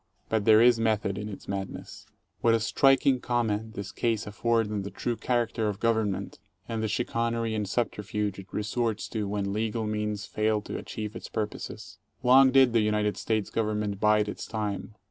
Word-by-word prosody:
But 110 -2 0
there 110 0 +7
is 120 -1 +5
method 110 -3 +1
in 105 0 -5
its 100 - -9
madness. 95 -1 -6 0.3
20 - - -38
What 115 -1 +4
a - - +2
striking 135 +3 +3
comment 110 -3 -1
this 100 -1 -5
case 115 -3 -1
afford 115 +1 0
on 105 -1 -1
the 100 - -5
true 120 +3 -3
character 115 -2 0
of 100 -1 -5
government, 110 -4 0 0.3
and 115 -1 -3
the 110 - 0
chicanery 115 0 -1
and 105 -3 -2
subterfuge 105 -3 -2
it 95 - -10
resorts 110 +1 -1
to 105 -3 -2
when 100 -1 -2
legal 110 +1 -1
means 105 -1 -2
fail 110 0 0
to - - -7
achieve 105 0 -6
its - - -7
purposes. 105 -1 -5 0.2
Long 130 +2 +7
did 130 -2 +5
the 115 - +4
United 105 -1 +1
States 110 -3 -1
Government 105 -2 -1
bide 105 0 +3
its 105 - -6
time. 105 -1 -4
110 Hz, 185 wpm, -28 LUFS, 105-115 Hz, 0.3 s, there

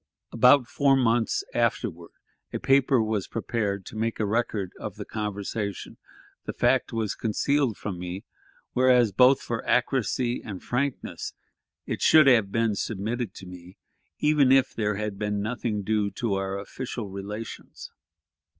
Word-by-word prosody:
About 125 +3 +5
four 140 0 +3
months 115 -2 +1
afterward 110 -7 -1 0.4
a - - -2
paper 135 -3 +3
was 110 -3 -2
prepared 105 -4 -2
to - - -10
make 115 +1 -2
a 110 - +1
record 105 -3 -1
of - - -6
the - - -7
conversation; 105 -1 -4 0.5
the - - -4
fact - - +2
was 110 -3 -1
concealed 125 +2 0
from 95 -4 -5
me, 90 +2 -6 0.5
whereas, 125 -3 +4
both 125 +7 +5
for 115 -1 -3
accuracy 125 -1 0
and 100 -4 -7
frankness, 135 +2 -3 0.5
it - - -4
should 155 -2 +7
have 115 -7 +4
been 115 0 +1
submitted 110 +1 -3
to 95 - -10
me, 90 0 -12 0.4
even 150 -3 +3
if 135 -1 +4
there 105 -2 -1
had 105 -1 -4
been 105 -1 -1
nothing 110 -1 -2
due 105 0 0
to 105 +2 -2
our 95 0 -2
official 120 +2 -6
relations. 105 +3 -8
110 Hz, 145 wpm, -26 LUFS, 100-125 Hz, 0.5 s, should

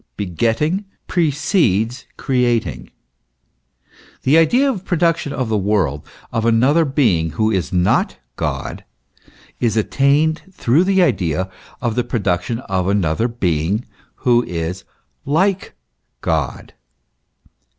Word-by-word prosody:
Begetting 115 - 0 0.2
precedes 140 - +1
creating. 125 -3 0 1.3
The 140 - +4
idea 240 - +4
of 255 -8 0
the - - -23
production 165 -4 0
of 130 -4 -2
the 110 -1 0
world, 95 -8 0 0.3
of 115 - 0
another 130 +8 +3
being 110 - +2
who 110 0 +1
is 90 -9 -1
not 90 -1 +1 0.2
God, - - -4 0.8
is 115 -2 +1
attained 140 +7 +2
through 150 +4 +2
the 190 -1 +3
idea 90 - 0 0.3
of 120 -2 0
the 125 +2 0
production 115 -1 -1
of 95 -5 -2
another 100 +1 +1
being 95 -2 -1 0.3
who 120 -1 +3
is 85 +2 -4 0.4
like 185 +7 0 0.5
God. - - -2
115 Hz, 110 wpm, -19 LUFS, 95-150 Hz, 1.3 s, The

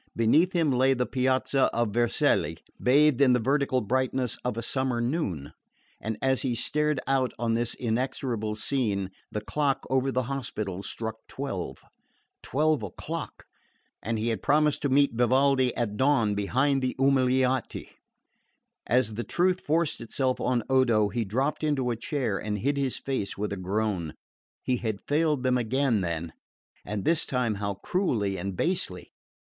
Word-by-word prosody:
Beneath 150 +11 +3
him 165 -5 +2
lay 130 +1 +3
the 125 0 0
piazza 130 +1 +1
of 115 -2 +1
Vercelli, 110 -8 +1 0.2
bathed 145 +1 +4
in 130 -2 +6
the 125 - +3
vertical 135 +1 +1
brightness 130 +1 0
of 125 -2 -2
a 115 - -3
summer 130 0 -1
noon; 120 - -2 0.5
and 110 -1 -3
as 130 -1 +2
he 125 -3 -1
stared 150 +3 0
out 135 -2 +1
on 115 -1 0
this 120 +1 -1
inexorable 115 -2 -2
scene, 105 -5 -1 0.2
the 105 - -3
clock 140 +5 -1
over 130 0 +2
the 130 0 0
Hospital 110 -7 -4
struck 110 +3 -5
twelve. 115 -10 -5 0.6
Twelve 155 0 +1
o'clock! 105 -4 -6 0.6
And 115 +1 -2
he 110 +2 -1
had 115 - -2
promised 150 0 +2
to 145 - 0
meet 140 0 +3
Vivaldi 130 +2 +3
at 105 -4 -2
dawn 130 -6 +3
behind 130 +7 +1
the 130 -1 -1
Umiliati! 130 -1 +1 1.0
As 120 -2 +2
the 120 +3 -3
truth 180 +5 +1
forced 160 -2 0
itself 130 +2 -1
on 125 -2 +1
Odo 120 -6 +3
he 120 +2 -1
dropped 130 +10 -1
into 135 -5 +1
a - - -1
chair 115 -4 -2
and 105 -1 -3
hid 140 +8 0
his 135 -2 0
face 130 -7 -3
with 105 0 -2
a - - -2
groan. 95 -3 -2 0.5
He 125 - +1
had 110 -4 -3
failed 150 -2 +1
them 125 -1 +2
again, 120 -1 +1
then 85 -2 -3 0.5
and 105 -2 -4
this 165 -1 +3
time 125 -4 0
how 100 -1 -2
cruelly 120 - -1
and 95 0 -4
basely! 165 - -1
125 Hz, 160 wpm, -27 LUFS, 110-135 Hz, 1.0 s, in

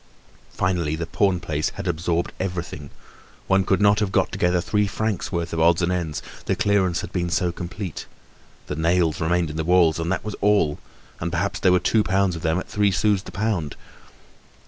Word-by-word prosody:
Finally 85 -4 0
the 85 +1 -3
pawn 95 +1 +1
place 75 -2 -2
had 100 -1 -5
absorbed 85 0 -1
everything, 90 -6 -4 0.6
one 95 0 +3
could 95 +1 +1
not 105 0 +4
have 105 -3 0
got - - +1
together 90 0 +1
three 105 +4 +1
francs' 110 -1 -2
worth 85 -1 -2
of 80 - -1
odds 85 +1 +4
and 85 - +1
ends, 85 -4 -2 0.2
the - - +2
clearance 95 -4 +1
had - - -7
been 90 -1 -1
so 90 0 +1
complete; 90 +1 -6 0.6
the 75 - -4
nails 80 0 +1
remained 85 0 +1
in 75 - -6
the 80 - -1
walls 85 -1 +4
and 85 +2 -2
that 95 - -2
was 105 - -4
all 100 -8 +2 0.4
and 85 +1 -3
perhaps 95 +3 -1
there 95 - +4
were 90 - +4
two 110 - +2
pounds 95 0 +1
of 80 - -6
them 80 +1 +1
at 90 - -4
three 105 -1 +2
sous 100 +1 +2
the - - -11
pound. 100 -8 -2
90 Hz, 200 wpm, -23 LUFS, 85-100 Hz, 0.6 s, not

